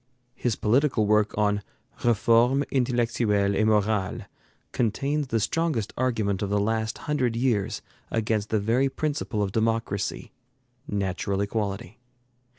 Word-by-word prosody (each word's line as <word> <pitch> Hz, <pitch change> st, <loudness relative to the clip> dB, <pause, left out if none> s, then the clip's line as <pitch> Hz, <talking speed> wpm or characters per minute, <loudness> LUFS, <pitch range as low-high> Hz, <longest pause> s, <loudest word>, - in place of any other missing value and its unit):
His 120 Hz, -3 st, -1 dB
political 125 Hz, 0 st, +2 dB
work 105 Hz, 0 st, +2 dB
on 105 Hz, -1 st, +2 dB, 0.4 s
'Reforme 120 Hz, +3 st, +3 dB
intellectuelle 115 Hz, -6 st, +1 dB
et 110 Hz, -, +2 dB
morale' 105 Hz, -3 st, +1 dB, 0.5 s
contains 140 Hz, +6 st, 0 dB
the 115 Hz, -2 st, 0 dB
strongest 155 Hz, -3 st, -1 dB
argument 110 Hz, -6 st, 0 dB
of 100 Hz, -, -1 dB
the 105 Hz, 0 st, +1 dB
last 110 Hz, +1 st, -1 dB
hundred 130 Hz, -6 st, 0 dB
years 115 Hz, -5 st, 0 dB, 0.3 s
against 110 Hz, -2 st, -1 dB
the 110 Hz, -, +1 dB
very 120 Hz, +6 st, +2 dB
principle 145 Hz, -8 st, -2 dB
of 95 Hz, -, -2 dB
democracy, 110 Hz, -2 st, -1 dB, 0.6 s
natural 100 Hz, 0 st, -2 dB
equality. 100 Hz, +2 st, -3 dB
110 Hz, 120 wpm, -26 LUFS, 105-125 Hz, 0.6 s, Reforme